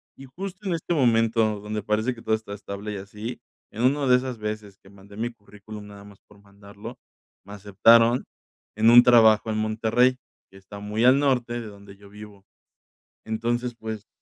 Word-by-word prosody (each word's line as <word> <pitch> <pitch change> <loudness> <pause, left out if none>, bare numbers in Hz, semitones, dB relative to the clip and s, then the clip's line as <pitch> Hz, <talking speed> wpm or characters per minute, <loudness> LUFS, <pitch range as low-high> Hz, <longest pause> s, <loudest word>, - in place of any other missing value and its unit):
Y 135 - -12
justo 190 +8 -8
en 180 - 0
este 165 +1 -3
momento 115 -5 +2
donde 105 0 -5
parece 110 +4 -1
que 115 - -13
todo 110 -1 0
está 110 -2 -8
estable, 100 +1 -7
y - - -5
así, 105 +5 -8 0.3
en 115 - -5
una 140 +2 +2
de 125 - +6
esas 125 -3 -5
veces 105 -2 -6
que 95 - -20
mandé 100 0 -16
mi 115 +2 -3
currículum 105 -1 -13
nada 100 -1 -13
más 100 -1 -16
por 105 -1 -20
mandarlo, 100 +3 -12 0.5
me 100 - -11
aceptaron 115 +4 +3 0.5
en 110 +2 +4
un 120 +1 +9
trabajo 110 -3 +5
en 110 - -2
Monterrey, 115 +4 +1 0.3
que 95 - -16
está 95 +1 -12
muy 105 +3 -1
al 130 +2 +6
norte 125 -4 0
de 110 - -8
donde 100 -1 -14
yo 100 0 -17
vivo. 105 -1 -14 0.8
Entonces, 120 +2 -2
pues, 110 -2 -7
110 Hz, 185 wpm, -24 LUFS, 100-120 Hz, 0.8 s, un